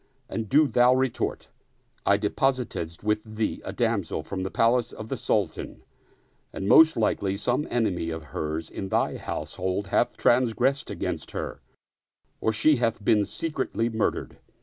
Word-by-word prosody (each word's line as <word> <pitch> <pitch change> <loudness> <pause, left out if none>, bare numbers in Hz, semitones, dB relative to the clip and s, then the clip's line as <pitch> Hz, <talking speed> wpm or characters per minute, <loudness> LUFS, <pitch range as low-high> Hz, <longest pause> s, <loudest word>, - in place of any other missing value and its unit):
And 110 -3 -4
do 150 +3 +5
thou 125 -2 +4
retort: 130 -1 -1 0.6
I 100 - +5
deposited 105 -6 -1
with 105 0 +1
thee 110 0 -1
a - - -5
damsel 110 -10 -1
from 95 +3 -5
the 95 - -2
palace 120 +3 +2
of 110 0 -9
the - - -1
Sultan, 105 -8 -2 0.7
and 95 - -4
most 160 +8 +7
likely 100 -3 0
some 125 +7 0
enemy 100 -8 0
of 80 -1 -5
hers 80 +1 -3
in 95 - -5
thy - - +1
house - - -5
hold 95 +1 -1
hath - - +1
transgressed 125 +3 +2
against - - -4
her - - -5 0.8
or 110 - +1
she 145 +7 +4
hath 115 -3 -1
been 105 -2 +4
secretly 130 -7 -2
murdered. 110 -2 -2
110 Hz, 150 wpm, -26 LUFS, 100-125 Hz, 0.8 s, most